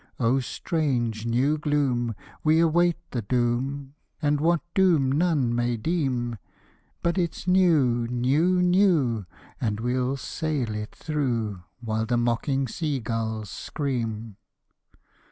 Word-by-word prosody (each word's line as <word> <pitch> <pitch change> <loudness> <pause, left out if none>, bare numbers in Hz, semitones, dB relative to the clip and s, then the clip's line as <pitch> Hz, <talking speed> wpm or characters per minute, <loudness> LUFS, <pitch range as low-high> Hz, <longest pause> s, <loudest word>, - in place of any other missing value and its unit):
O 125 +2 +3
strange 120 -6 -1
new 135 +6 +2
gloom! 130 -6 0 0.3
we 155 +1 +4
await 170 +1 +3
the 120 - -2
doom, 130 +4 -1 0.3
And 145 -1 +1
what 170 +1 +3
doom 165 -9 +3
none 145 -5 +2
may 120 0 0
deem; 125 - -1 0.6
But 170 +2 +1
it's 170 0 -2
new, 150 -11 +3
new, 145 +10 +2
new 170 - +3 0.3
and 105 -4 -1
we'll 125 +3 0
sail 145 -6 -2
it 105 0 -6
through, 120 - -2 0.2
While 110 -1 -2
the 120 +1 +1
mocking 125 +3 0
sea 145 +2 -2
gulls 110 -2 -3
scream. 115 -7 -3
130 Hz, 120 wpm, -26 LUFS, 115-155 Hz, 0.6 s, we